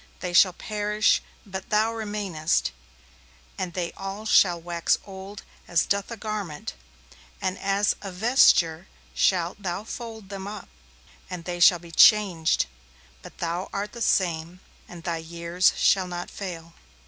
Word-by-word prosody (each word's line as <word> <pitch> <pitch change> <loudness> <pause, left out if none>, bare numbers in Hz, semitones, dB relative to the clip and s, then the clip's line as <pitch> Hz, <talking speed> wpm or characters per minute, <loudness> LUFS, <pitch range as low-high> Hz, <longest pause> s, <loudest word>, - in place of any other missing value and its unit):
They 180 -1 -4
shall 185 +1 +6
perish, 210 +2 +1 0.2
but 190 -2 -7
Thou 215 +2 +2
remainest, 205 - -1 0.8
and 185 -2 -4
they 175 -2 -2
all 195 +2 -7
shall 175 -5 +4
wax 170 0 0
old 195 +1 -9 0.2
as 170 -2 +2
doth 200 0 -1
a 235 - -6
garment, 205 -8 -5 0.7
and 185 -2 -1
as 200 +1 +1
a 195 - -6
vesture 180 -5 +4 0.3
shalt 180 +1 +1
Thou 185 +1 -3
fold 225 -3 -8
them 195 -1 -6
up, 205 -2 -8 0.6
and 180 -2 -6
they 175 -1 -4
shall 175 0 +7
be 170 0 -14
changed; 180 -3 +5 0.6
but - - -13
Thou 170 +2 -3
art 200 +1 -3
the 235 - -9
same, 175 -3 0 0.3
and 175 -2 -10
Thy 170 -1 -2
years 170 +2 +1
shall 190 -2 +3
not 175 0 -6
fail.' 170 -4 -7
185 Hz, 145 wpm, -25 LUFS, 170-205 Hz, 0.8 s, shall